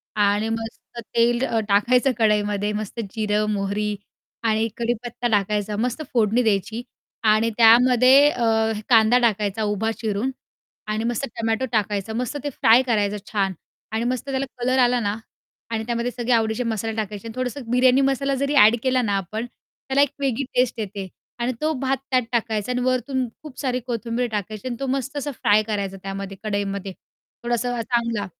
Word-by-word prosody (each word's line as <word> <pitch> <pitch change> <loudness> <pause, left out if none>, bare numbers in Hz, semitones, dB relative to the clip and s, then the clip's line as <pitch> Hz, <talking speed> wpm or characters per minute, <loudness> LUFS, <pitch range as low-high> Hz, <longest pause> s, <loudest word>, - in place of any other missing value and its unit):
आणि 205 +1 +2
मस्त 225 +1 -6 0.2
तेल 235 +2 +3
अ, 225 - 0
टाकायचं 245 +6 +3
कढईमध्ये, 210 -2 +1
मस्त 215 +2 -5
जिरं, 210 -1 0
मोहरी 205 +1 -1 0.5
आणि 220 +1 +2
कढीपत्ता 240 +1 -2
टाकायचा 210 -1 0
मस्त 245 +6 -1
फोडणी 230 +1 +3
द्यायची 220 +2 0 0.4
आणि 215 +1 +4
त्यामध्ये 255 +4 +7
अ, 225 -3 +1 0.2
कांदा 225 0 +6
टाकायचा 215 -2 0
उभा 210 +2 0
चिरून 220 +4 -1 0.6
आणि 215 +1 -1
मस्त 240 +3 -1
टोमॅटो 225 +2 0
टाकायचा 210 -1 -1
मस्त 250 +5 -2
ते 290 - -1
फ्राय 240 -2 +5
करायचं 210 -4 0
छान 195 -3 0 0.4
आणि 220 +1 -1
मस्त 255 +2 -2
त्याला 270 0 -1 0.2
कलर 255 +2 +1
आला 245 0 +4
ना 205 -2 -1 0.6
आणि 220 -1 -1
त्यामध्ये 235 +1 -1
सगळे 245 0 -3
आवडीचे 225 +1 +1
मसाले 225 -1 -2
टाकायचे 210 0 -4
आणि 225 - -7
थोडंसं 255 +2 -3
बिर्याणी 255 +2 +4
मसाला 275 0 +1
जरी 280 +2 -1
ॲड 225 -3 +7
केला 255 -1 +2
ना 205 -4 0
आपण, 215 +5 -4
त्याला 265 +2 -3
एक 285 - +4
वेगळी 275 -1 0
टेस्ट 245 -2 +1
येते 200 -2 -5 0.3
आणि 240 +2 0
तो 310 +1 +1
भात 270 0 +1
त्यात 255 -1 +4
टाकायचा 225 -1 -1
आणि 250 0 -1
वरुन 255 0 0 0.2
खूप 300 -4 -10
सारी 255 -3 -1
कोथिंबीर 235 +1 -2
टाकायची 210 +2 -4
आणि 245 - -3
तो 275 - -2
मस्त 270 +2 -2
असा 290 0 -3
फ्राय 215 -4 +3
करायचा 200 -3 -3
त्यामध्ये 195 0 -6
कढईमध्ये. 200 -2 -3 0.5
थोडासा 240 0 -1
चांगला 235 -3 -1
230 Hz, 165 wpm, -23 LUFS, 210-250 Hz, 0.6 s, त्यामध्ये